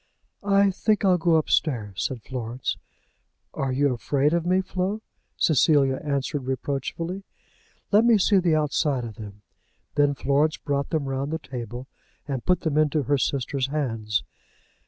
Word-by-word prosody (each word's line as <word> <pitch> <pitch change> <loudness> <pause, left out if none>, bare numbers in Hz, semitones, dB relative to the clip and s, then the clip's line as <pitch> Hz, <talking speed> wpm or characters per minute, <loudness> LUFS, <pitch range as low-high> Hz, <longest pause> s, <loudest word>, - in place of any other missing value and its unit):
"I 200 0 +3
think 210 +2 +1
I'll 180 -2 +4
go 165 0 +3
upstairs," 115 - 0
said 125 -4 -4
Florence. 125 -1 -4 0.8
"Are 135 -1 -2
you 140 +1 +2
afraid 140 +6 +1
of 170 0 0
me, 185 +1 +3
Flo?" 190 +3 -3 0.3
Cecilia 140 -3 +3
answered 140 -1 -2
reproachfully. 145 +8 -3 0.7
"Let 215 +3 +5
me 235 -2 +6
see 200 0 +4
the 170 -3 +2
outside 145 -3 +1
of 110 -2 -9
them." 105 -1 -10 0.5
Then 145 -1 +2
Florence 145 +3 +1
brought 140 -1 -2
them 155 -4 -1
round 135 +2 -2
the 160 - -1
table, 125 -4 -7 0.4
and 135 -4 -3
put 180 -1 +2
them 155 -3 +1
into 155 -1 +2
her 145 +2 +1
sister's 130 +1 -1
hands. 115 -7 -1
145 Hz, 150 wpm, -25 LUFS, 130-170 Hz, 0.8 s, me